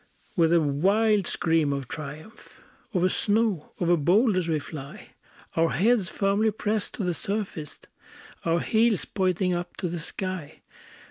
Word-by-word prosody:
with 165 Hz, -2 st, +3 dB
a 170 Hz, -, +5 dB
wild 195 Hz, +8 st, +2 dB
scream 160 Hz, -3 st, +1 dB
of 140 Hz, -2 st, -3 dB
triumph, 155 Hz, -, -9 dB, 0.3 s
Over 185 Hz, -3 st, +2 dB
snow, 205 Hz, -4 st, 0 dB
over 175 Hz, 0 st, +3 dB
boulders 185 Hz, -, +3 dB
we 160 Hz, -2 st, +1 dB
fly, 140 Hz, -1 st, -8 dB, 0.5 s
Our 165 Hz, 0 st, +3 dB
heads 215 Hz, 0 st, +2 dB
firmly 200 Hz, +2 st, +1 dB
pressed 210 Hz, 0 st, -2 dB
to 215 Hz, -, -3 dB
the 180 Hz, -1 st, 0 dB
surface, 185 Hz, -4 st, -4 dB, 0.6 s
Our 170 Hz, 0 st, +1 dB
heels 225 Hz, -2 st, +2 dB
pointing 185 Hz, -2 st, 0 dB
up 175 Hz, 0 st, -4 dB
to 185 Hz, -, -2 dB
the 170 Hz, 0 st, -4 dB
sky! 185 Hz, -1 st, -5 dB
180 Hz, 140 wpm, -26 LUFS, 160-205 Hz, 0.6 s, a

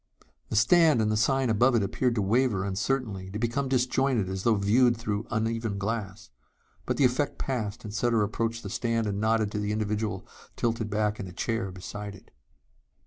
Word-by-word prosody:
The -, -, -3 dB
stand 155 Hz, +5 st, +5 dB
and 110 Hz, -1 st, +2 dB
the -, -, +1 dB
sign 130 Hz, +3 st, +2 dB
above 120 Hz, +4 st, +4 dB
it 110 Hz, -, +3 dB
appeared 120 Hz, +5 st, 0 dB
to 105 Hz, -, +1 dB
waver 110 Hz, -2 st, +1 dB
uncertainly, 100 Hz, -1 st, -2 dB
to 100 Hz, -, -5 dB
become 120 Hz, +4 st, -1 dB
disjointed 130 Hz, -4 st, +1 dB
as 95 Hz, 0 st, -3 dB
though 115 Hz, +2 st, +3 dB
viewed 115 Hz, +4 st, +3 dB
through 105 Hz, -1 st, -3 dB
uneven 115 Hz, -2 st, -1 dB
glass. 105 Hz, +1 st, -4 dB, 0.6 s
But -, -, 0 dB
the 140 Hz, -, +4 dB
effect 130 Hz, +4 st, 0 dB
passed 115 Hz, -5 st, -3 dB
and 105 Hz, -2 st, -7 dB
Sutter 115 Hz, -1 st, +2 dB
approached 115 Hz, +2 st, -2 dB
the 100 Hz, -, -6 dB
stand 115 Hz, 0 st, 0 dB
and 100 Hz, -1 st, -2 dB
nodded 110 Hz, -1 st, +1 dB
to 105 Hz, -, -2 dB
the 105 Hz, 0 st, -1 dB
individual 105 Hz, -1 st, -2 dB, 0.3 s
tilted 115 Hz, -2 st, -1 dB
back 105 Hz, 0 st, 0 dB
in 95 Hz, -, -5 dB
a -, -, -9 dB
chair 115 Hz, +2 st, -2 dB
beside 100 Hz, +2 st, -7 dB
it. -, -, -18 dB
110 Hz, 190 wpm, -27 LUFS, 105-120 Hz, 0.6 s, stand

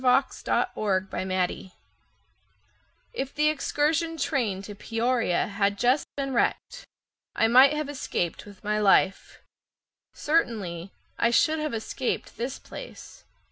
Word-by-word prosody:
Barney 255 Hz, +1 st, +5 dB
Hainsfeather 190 Hz, -2 st, -1 dB, 1.4 s
If 275 Hz, -, -4 dB
the 300 Hz, +1 st, +3 dB
excursion 310 Hz, +2 st, 0 dB
train 235 Hz, -10 st, -1 dB
to 205 Hz, -, -8 dB
Peoria 230 Hz, -1 st, 0 dB
Had 200 Hz, 0 st, 0 dB
just 250 Hz, +7 st, +2 dB
been 275 Hz, -1 st, -2 dB
wrecked, -, -, -1 dB, 0.5 s
I 225 Hz, -, +3 dB
might 260 Hz, +5 st, +7 dB
have 300 Hz, -1 st, -2 dB
escaped 235 Hz, -, -3 dB
with 200 Hz, 0 st, -14 dB
my 210 Hz, 0 st, 0 dB
life— 195 Hz, -1 st, +2 dB, 0.7 s
Certainly 200 Hz, -, -1 dB, 0.3 s
I 235 Hz, -, +4 dB
should 310 Hz, +6 st, +3 dB
have 305 Hz, -5 st, -2 dB
escaped 235 Hz, +3 st, -3 dB
this 250 Hz, +3 st, -3 dB
place. -, -, -11 dB
235 Hz, 115 wpm, -26 LUFS, 200-285 Hz, 1.4 s, might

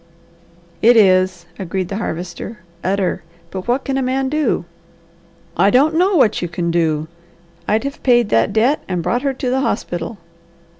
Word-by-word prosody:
"It 235 Hz, +1 st, +6 dB
is," 185 Hz, -3 st, +3 dB
agreed 185 Hz, -1 st, -3 dB
the 195 Hz, -, -3 dB
Harvester. 180 Hz, +2 st, -5 dB, 0.2 s
"Utter! 190 Hz, 0 st, 0 dB, 0.3 s
But 190 Hz, +2 st, -6 dB
what 250 Hz, +3 st, +1 dB
can 270 Hz, 0 st, -1 dB
a -, -, 0 dB
man 265 Hz, +1 st, 0 dB
do?" 305 Hz, +1 st, 0 dB, 0.9 s
"I -, -, +4 dB
don't 285 Hz, +5 st, +4 dB
know 365 Hz, +4 st, +2 dB
what 250 Hz, -10 st, +3 dB
you 175 Hz, -, -2 dB
can 170 Hz, 0 st, -2 dB
do! 160 Hz, -2 st, 0 dB, 0.6 s
I'd 215 Hz, +3 st, +1 dB
have 280 Hz, +1 st, -5 dB
paid 240 Hz, -4 st, +3 dB
that 115 Hz, -, +2 dB
debt 235 Hz, +8 st, +2 dB
and 180 Hz, -3 st, -2 dB
brought 235 Hz, +9 st, 0 dB
her 275 Hz, -1 st, -1 dB
to 255 Hz, -1 st, -2 dB
the 265 Hz, +1 st, +1 dB
hospital." 190 Hz, -5 st, -3 dB
215 Hz, 165 wpm, -18 LUFS, 180-265 Hz, 0.9 s, It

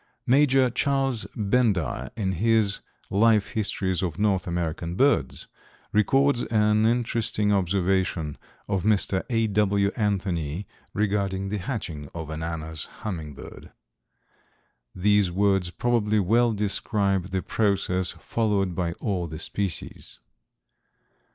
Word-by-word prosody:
Major 135 Hz, -1 st, +4 dB
Charles 135 Hz, -2 st, +1 dB
Bendire 105 Hz, -, +1 dB
in 95 Hz, -4 st, 0 dB
his 105 Hz, +2 st, +2 dB, 0.3 s
"Life 105 Hz, 0 st, +3 dB
Histories 95 Hz, -4 st, -1 dB
of 90 Hz, -3 st, -3 dB
North 100 Hz, -4 st, +1 dB
American 85 Hz, 0 st, -3 dB
Birds," 140 Hz, +7 st, +1 dB, 0.5 s
records 135 Hz, +4 st, +3 dB
an 105 Hz, 0 st, +3 dB
interesting 115 Hz, -3 st, +1 dB
observation 95 Hz, -4 st, 0 dB, 0.3 s
of 95 Hz, -2 st, 0 dB
Mr. 100 Hz, -2 st, +2 dB
A. 115 Hz, -2 st, +2 dB
W. 100 Hz, -1 st, +2 dB
Anthony 95 Hz, -, -1 dB, 0.3 s
regarding 100 Hz, -2 st, 0 dB
the 105 Hz, +1 st, -2 dB
hatching 90 Hz, -, -5 dB
of 80 Hz, -2 st, -6 dB
an 80 Hz, +1 st, -5 dB
Anna's 80 Hz, -1 st, -4 dB, 0.2 s
Hummingbird. 80 Hz, -8 st, -7 dB, 1.2 s
These 100 Hz, 0 st, +3 dB
words 95 Hz, -1 st, +2 dB
probably 110 Hz, +1 st, +1 dB
well 115 Hz, +5 st, +3 dB
describe 100 Hz, -2 st, 0 dB
the 95 Hz, 0 st, -3 dB
process 95 Hz, -4 st, 0 dB
followed 100 Hz, -5 st, -1 dB
by 85 Hz, -1 st, -2 dB
all 90 Hz, -3 st, -2 dB
the 80 Hz, 0 st, -7 dB
species. 95 Hz, +1 st, -4 dB
100 Hz, 110 wpm, -25 LUFS, 90-110 Hz, 1.2 s, Major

